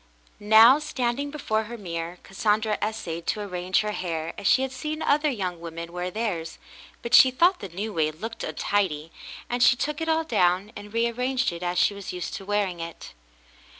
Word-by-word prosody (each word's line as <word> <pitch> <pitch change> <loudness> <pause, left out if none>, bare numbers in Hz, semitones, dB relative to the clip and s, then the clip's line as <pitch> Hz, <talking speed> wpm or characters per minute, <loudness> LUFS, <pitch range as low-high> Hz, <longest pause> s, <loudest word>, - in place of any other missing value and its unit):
Now, 220 +6 +7
standing 280 -2 -2
before 220 -7 -2
her 235 +2 -7
mirror, 170 -3 -5
Cassandra 210 +2 0
essayed 175 -6 -4
to 215 - 0
arrange 180 -2 0
her 210 0 -2
hair 165 -5 -3
as 200 - -3
she 265 - +4
had 265 - -3
seen 305 +4 -4
other 300 +1 +3
young 185 -9 -3
women 170 0 -7
wear 180 0 -3
theirs, 180 -6 -3 0.5
but 235 - -5
she 260 - +9
thought 345 +9 +3
the 195 - -7
new 205 +5 -5
way 155 -3 +1
looked 220 +9 -7
untidy, 165 -6 -1 0.4
and 245 0 -2
she 245 - +6
took 300 +4 -3
it 325 - -1
all 320 0 +2
down 195 - +1
and 205 0 -9
rearranged 250 +3 0
it 170 0 -7
as 180 0 -2
she 190 - +3
was 200 -1 -7
used 180 -1 -5
to 195 - -6
wear 205 0 +1
it. 170 -2 -8
210 Hz, 190 wpm, -25 LUFS, 180-245 Hz, 0.5 s, she